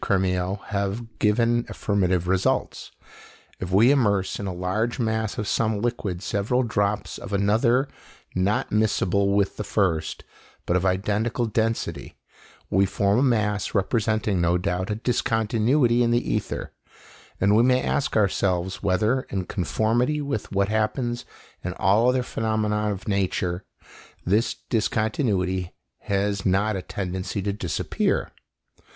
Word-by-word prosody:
Crémieux 95 0 0
have 100 +3 -3
given 115 +2 +2
affirmative 90 -4 0
results: 95 0 0 0.7
if 90 - -4
we 105 +8 +5
immerse 100 -9 +1
in 100 - -4
a - - -2
large 95 +6 -1
mass 110 -3 -1
of 105 - -2
some 110 -1 +1
liquid 105 -6 -2
several 115 +6 0
drops 105 -3 -1
of - - -8
another 115 +7 +2 0.5
not 95 +3 0
miscible 100 -2 +2
with 100 -1 +1
the 105 - -3
first, 85 -7 -1 0.4
but 85 - +1
of 90 +1 +2
identical 105 +6 0
density, 115 +1 -2 0.6
we 95 - +4
form 100 +4 +1
a - - +2
mass 105 -7 +1
representing 105 -1 +1
no 85 +1 +3
doubt 90 +2 -2
a 105 - 0
discontinuity 120 +2 +1
in 120 - +3
the 120 +1 +1
ether, - - -3 0.7
and 100 +2 +4
we 110 - +6
may 125 +1 +4
ask 140 -4 0
ourselves 95 -2 0
whether, 110 +7 +2
in 95 -2 -2
conformity 115 - 0
with 140 -7 -3
what 100 0 +1
happens 120 +3 -1 0.4
in - - -3
all 105 +6 +3
other 125 0 +1
phenomena 105 -2 -1
of 100 +2 -6
nature, 95 -2 -1 0.6
this 105 +6 +2 0.2
discontinuity 105 -5 0 0.2
has 100 -1 -1
not 100 +3 +2
a 95 - -3
tendency 95 +1 -4
to 100 0 -1
disappear. 95 -5 -1
105 Hz, 135 wpm, -24 LUFS, 95-115 Hz, 0.7 s, we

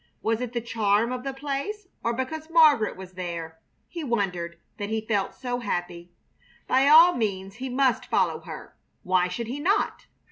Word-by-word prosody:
Was 225 +1 0
it 250 -1 -4
the 235 - -1
charm 225 0 +1
of 250 0 -4
the 270 - -2
place 285 +10 -4 0.2
or 235 - +1
because 305 +6 -4
Margaret 305 - +5
was 190 -1 -9
there, 170 -3 -6 0.3
he 340 -2 -6
wondered, 180 - -2 0.2
that 205 0 -3
he 220 0 0
felt 205 -3 -1
so 245 -1 -3
happy? 175 -5 -4 0.5
By 265 +2 +3
all 330 +4 +8
means 195 -3 -3
he 260 +1 -4
must 255 -1 +1
follow - - +1
her. - - -10 0.3
Why 180 0 +2
should 180 +6 -4
he 255 +6 -5
not? 385 +8 0
235 Hz, 175 wpm, -26 LUFS, 190-275 Hz, 0.5 s, all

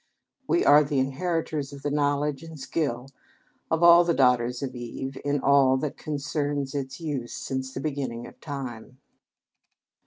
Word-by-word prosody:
We 350 - +2
are 150 +1 +7
the 145 0 -2
inheritors 150 +1 -1
of 140 -1 -10
the 145 - -1
knowledge 145 -1 0
and 160 -2 -10
skill 135 -3 -2 0.6
of 160 +1 +1
all 170 0 +9
the 170 -1 +1
daughters 125 -1 +2
of 130 -2 -4
Eve 125 +2 -6
in 145 0 0
all 135 -1 +4
that 145 +1 -3
concerns 145 -2 -3
its 135 0 -4
use 145 -7 -4
since 130 0 -4
the - - -5
beginning 135 -6 -3
of - - -14
time. 130 -4 -7
140 Hz, 155 wpm, -26 LUFS, 130-150 Hz, 0.6 s, all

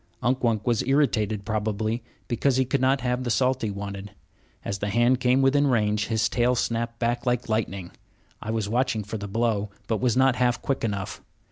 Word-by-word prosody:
Unk 125 +3 +1
Wunk 110 -3 +1
was 120 -3 +2
irritated, 110 -7 +1
probably, 110 +1 -1 0.3
because 125 +2 +1
he 130 - +3
could 130 +1 0
not 135 0 +3
have 125 0 -1
the 120 - -2
salt 130 +2 +2
he 110 - -1
wanted. 100 0 -6 0.6
As 100 - -3
the 105 - -2
hand 120 +4 +3
came 130 +1 +3
within 140 +2 +4
range, 105 -4 +1
his 110 -1 +1
tail 125 +3 +1
snapped 115 0 -1
back 120 +1 -1
like 125 0 0
lightning. 100 -5 -2 0.5
I - - -6
was 110 -2 -1
watching 120 0 0
for 105 +2 -5
the 100 - -5
blow, 110 -1 0 0.2
but 110 -3 -1
was 125 -2 +2
not 130 -1 +4
half 125 -1 +2
quick 135 - -2
enough. 100 -4 -3
115 Hz, 200 wpm, -25 LUFS, 105-125 Hz, 0.6 s, within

